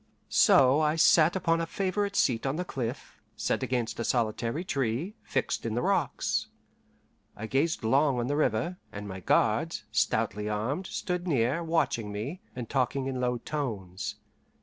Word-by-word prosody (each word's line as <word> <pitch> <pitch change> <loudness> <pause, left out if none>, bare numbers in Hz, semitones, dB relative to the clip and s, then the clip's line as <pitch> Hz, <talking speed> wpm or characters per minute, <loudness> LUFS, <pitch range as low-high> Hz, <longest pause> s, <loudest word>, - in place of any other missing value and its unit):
So 135 +2 +5
I 155 0 +2
sat 165 +1 +5
upon 165 -3 +1
a 165 - -2
favourite 200 +2 -1
seat 125 - +2
on 135 - 0
the 180 +2 -2
cliff, 125 -4 -5
set - - -1
against 120 -3 -2
a - - 0
solitary 115 +6 0
tree, 140 - -1
fixed - - -2
in 115 -1 -2
the 120 - 0
rocks. - - 0 0.9
I 110 - -5
gazed 140 +7 0
long 135 +4 +3
on 120 - 0
the 145 +3 -1
river, 150 +4 0
and 105 0 -7
my 95 -1 -6
guards, 90 - +1
stoutly 105 +2 0
armed, 125 - -2
stood 180 0 -3
near, 140 +2 +1
watching 160 -10 0
me, 130 - -5
and 125 -2 -5
talking 135 +1 0
in 130 -1 -2
low 125 -1 +1
tones. 110 -10 -4
130 Hz, 160 wpm, -29 LUFS, 115-160 Hz, 0.9 s, So